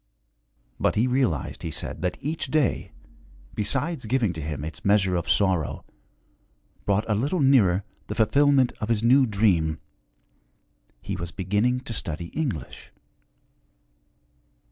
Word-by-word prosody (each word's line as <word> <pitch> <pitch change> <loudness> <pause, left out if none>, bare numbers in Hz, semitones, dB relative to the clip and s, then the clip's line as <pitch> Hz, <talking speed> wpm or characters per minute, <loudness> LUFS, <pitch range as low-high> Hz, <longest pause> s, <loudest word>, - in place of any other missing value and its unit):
But - - +1
he 110 - +3
realized, 125 - 0
he 80 - -4
said, - - -5
that 90 0 -1
each 150 +2 -3
day, 150 -1 0 0.6
besides 135 +4 -1
giving 115 -5 +1
to 80 - -6
him 75 -1 -4
its 80 - -7
measure 100 -3 +3
of 85 - -2
sorrow, 95 -6 +1 1.0
brought 105 +2 +1
a 110 - +1
little 140 - 0
nearer 110 -10 +4 0.2
the - - -4
fulfillment 140 +3 +3
of 110 - -3
his 115 -1 +1
new 130 +3 +5
dream. 95 -7 +2 1.3
He - - -3
was 85 0 -5
beginning 105 +8 0
to 125 -3 -6
study 85 -4 -3
English. 115 - -5
105 Hz, 130 wpm, -25 LUFS, 90-130 Hz, 1.3 s, new